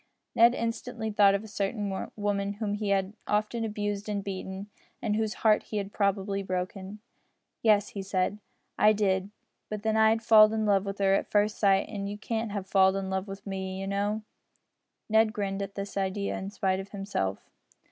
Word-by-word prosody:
Ned 235 +2 +6
instantly 230 -1 -3
thought 200 -1 +5
of 200 - -2
a - - -9
certain 200 -1 -3
woman 205 -1 -1
whom 205 0 -3
he 205 0 -2
had 195 0 +1
often 215 +2 0
abused 205 -1 -3
and 200 -1 -2
beaten, 190 0 -5 0.3
and 210 -3 -1
whose 220 0 -1
heart 215 -1 +6
he 215 - -5
had 200 0 -4
probably 200 -1 0
broken. 190 +2 -4 0.6
"Yes," 210 -2 +4
he 200 - -5
said, 190 +1 -1 0.4
"I 215 0 +6
did; 195 -2 +1 0.4
but 210 -1 -5
then 220 0 +1
I 220 0 +6
had 225 +1 +1
falled 215 -1 +7
in 220 -1 0
love 200 -1 +3
wi' 195 - -1
her 195 -1 +3
at - - 0
first 210 0 +1
sight, 195 -2 +3
and 200 -2 -4
you 205 - -5
can't 225 0 -3
have 200 -2 -3
falled 190 0 +4
in 195 -1 -3
love 190 +1 -2
wi' 195 - -5
me, 190 -1 -4
you 195 - -4
know." 205 +2 -1 0.8
Ned 220 0 +3
grinned 200 -2 -2
at 200 0 -5
this 200 0 -5
idea 200 +1 -1
in 190 - -5
spite 190 -2 0
of 195 +1 -7
himself. 195 - -3
200 Hz, 195 wpm, -28 LUFS, 195-215 Hz, 0.8 s, falled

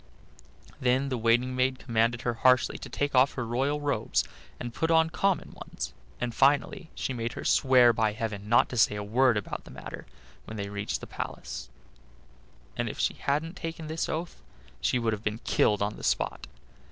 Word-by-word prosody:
Then 130 +2 +2
the 130 - -1
waiting 120 +3 +2
maid 130 +1 +1
commanded 115 -1 0
her 120 - 0
harshly 125 +2 +3
to - - -8
take 145 0 -1
off 130 +1 +5
her 125 - -2
royal 135 +6 0
robes, 140 - 0 0.4
and 120 -1 -5
to - - -13
put 160 - +1
on 160 0 +4
her - - -24
common 195 -4 +1
ones, - - -7 0.3
and 120 -1 -2
finally 145 +6 +2
she 130 - -2
made 115 -1 -3
her - - -7
swear 125 -3 +5
by 110 -2 +1
heaven 105 -2 -4
not 120 - +5
to 125 - -5
say 105 - +4
a 105 - -3
word 120 +3 +3
about 105 - -4
the - - -14
matter - - -9 0.4
when 110 - -7
they 100 -1 -4
reached 100 0 -3
the - - -6
palace; 60 0 -6 1.1
and - - -1
if - - -7
she - - +1
hadn't 155 +5 -1
taken 165 -3 -5
this 160 +1 -2
oath 165 +2 -4 0.4
she - - +2
would 115 -2 0
have 105 0 -5
been 105 0 -1
killed 105 -1 +2
on 105 +1 -2
the - - -11
spot. - - -1
125 Hz, 200 wpm, -28 LUFS, 110-140 Hz, 1.1 s, off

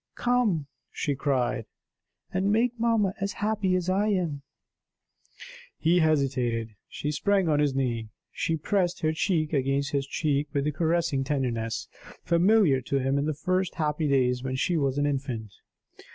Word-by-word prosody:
"Come," 240 -11 +1 0.2
she 145 - -2
cried, 130 -4 -1 0.7
"and 190 +2 +1
make 230 +3 +3
mamma 225 -4 +2
as 200 0 -1
happy 205 -3 0
as 180 -1 -1
I 195 +3 +2
am!" 175 -9 -1 1.4
He 170 +3 +3
hesitated. 130 -8 +1 0.2
She 150 - -3
sprang 195 +3 +1
on 150 -2 +2
his 145 -2 +1
knee; 120 -5 -1 0.2
she 165 - -1
pressed 180 +2 0
her 155 0 +1
cheek 160 -2 0
against 140 0 0
his 140 -2 -1
cheek 145 0 0
with 140 -2 +1
the 150 - 0
caressing 160 -3 0
tenderness, 125 -6 -2 0.4
familiar 170 -5 +4
to 140 +3 -1
him 135 +1 +1
in 145 - -1
the 155 - -1
first 185 +3 -1
happy 150 -1 0
days 125 -3 +2
when 130 0 -3
she 170 +6 0
was 140 -3 0
an 145 - +2
infant. 130 -7 -3
150 Hz, 155 wpm, -27 LUFS, 135-185 Hz, 1.4 s, familiar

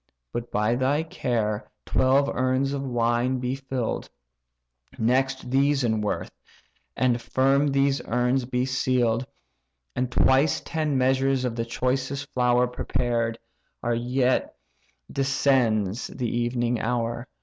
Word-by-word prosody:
But 120 0 -4
by 105 +2 +1
thy 135 +5 +1
care 115 -8 -2 0.2
twelve 135 +2 +3
urns 130 +1 0
of 140 - -2
wine 120 0 0
be 125 0 -2
fill'd; 135 -3 -3 0.9
Next 130 +2 0
these 140 +1 +3
in 110 -2 +1
worth, 105 - -2 0.7
and 125 -2 +2
firm 135 +4 +2
these 140 0 +2
urns 125 +2 +1
be 125 0 -1
seal'd; 125 -2 +1 0.7
And 125 -1 -1
twice 135 +5 +3
ten 155 -4 -1
measures 130 0 +2
of 120 -2 -2
the 115 -1 -2
choicest 130 +4 -2
flour 125 0 +3
Prepared, 120 -2 -1 0.5
ere 120 - +2
yet 125 +2 0 0.6
descends 125 -6 +1
the 120 -3 -3
evening 120 0 0
hour. 120 +1 -2
125 Hz, 120 wpm, -25 LUFS, 120-135 Hz, 0.9 s, twelve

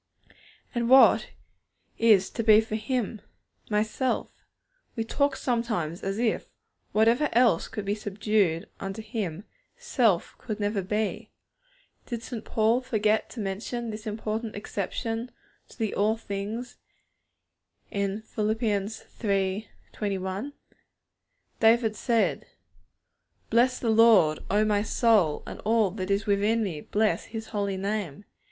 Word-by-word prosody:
And 235 -1 -1
what 265 +1 +7 0.7
is 215 -4 +4
to 230 - -3
be 215 -1 +7
for 220 -1 -3
Him? 220 -1 -2 0.5
My 210 -1 +2
self. 250 +4 -2 0.6
We 225 - -1
talk 280 +4 0
sometimes 220 - -2
as 195 +1 -3
if, 230 -1 0 0.4
whatever 230 +7 +3
else 230 -7 +4
could 210 - -6
be 200 - 0
subdued 205 -4 0
unto 195 +3 -5
Him, 205 -5 -4 0.3
self 245 - +1
could 215 -3 -5
never 205 -1 0
be. 210 +3 -2 0.8
Did 235 -2 -4
St. 235 -3 -6
Paul 225 +3 +2
forget 215 -4 +1
to 245 - -9
mention 220 +4 -3
this 215 +1 -7
important 215 +1 -3
exception 225 +4 -3 0.4
to - - -16
the 220 -4 -1
'all 215 +2 +1
things' 215 +4 -5 1.1
in 200 +1 -2
Phil. 215 -1 -2 0.7
iii. 195 0 0 0.2
21? 200 +5 -3 1.1
David 225 -1 +4
said: 230 -1 0 1.0
'Bless 245 +3 +4
the 230 - 0
Lord, 220 -9 +5
O 210 +2 +3
my 210 -1 +2
soul, 210 -7 +2
and - - -8
all 220 -3 +2
that 185 -1 -5
is 200 0 +1
within 210 +3 +2
me, 165 -7 -4
bless 215 +5 0
His 220 -1 -7
Holy 200 -3 -2
Name.' 200 -3 -3
215 Hz, 125 wpm, -27 LUFS, 200-230 Hz, 1.1 s, what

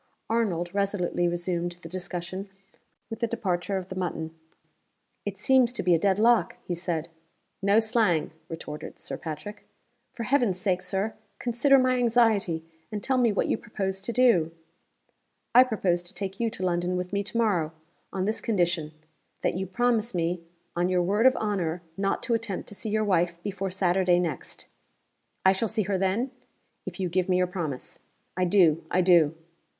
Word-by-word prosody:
Arnold 180 -7 0
resolutely 195 -3 0
resumed 175 0 -1
the - - -6
discussion 185 +2 -5 0.6
with 225 - -5
the 235 - +1
departure 195 -4 -1
of 185 -1 -6
the 185 - -6
mutton. 165 -3 -3 0.9
"It 200 -1 -3
seems 255 +3 +4
to 240 - -2
be 180 0 +4
a 165 - +4
dead 195 +1 +2
lock," 220 -4 +3
he 180 - -3
said. 170 -2 -2 0.5
"No 200 +2 +4
slang!" 220 -8 +2 0.2
retorted 150 -2 -7
Sir - - -5
Patrick. 165 +7 -7 0.5
"For 235 - -5
Heaven's 240 -6 +2
sake, 185 -2 +1
Sir, 195 +3 -1 0.2
consider 260 +3 +3
my 255 -1 +3
anxiety, 220 -9 +2 0.3
and 210 -1 -4
tell 260 -1 +2
me 235 -3 +4
what 205 - 0
you - - +1
propose 195 -3 -3
to 195 - -2
do!" 235 -10 +4 1.0
"I 250 - +9
propose 195 -8 0
to 175 - -8
take 195 -1 -5
you 230 -1 +1
to 185 -3 -4
London 175 0 0
with 180 +1 -4
me 200 - +1
to 210 +3 -4
morrow, 185 -9 +2 0.4
on 190 -1 -1
this 215 +2 -1
condition 175 -7 0 0.5
that - - +2
you 190 +2 -3
promise 235 +1 +1
me, 170 +1 0 0.3
on 175 +1 +1
your 180 -1 +2
word 205 +7 +4
of 260 - +4
honor, 180 -5 -1
not 195 +1 -1
to 235 - 0
attempt 225 -5 -2
to - - -10
see 215 +2 -4
your 215 +1 +1
wife 175 -3 +2
before 195 -1 -3
Saturday 180 -1 +2
next." 165 -6 -3 0.8
"I 190 - +8
shall 195 +4 0
see 220 0 0
her 195 0 -1
then?" 200 +7 0 0.6
"If - - -6
you 185 - 0
give 180 +2 0
me 180 - +4
your 180 - +3
promise." 170 -7 -4 0.4
"I 185 - +1
do! 170 -4 +4
I 185 - +3
do!" 170 -4 +5
190 Hz, 175 wpm, -27 LUFS, 175-220 Hz, 1.0 s, I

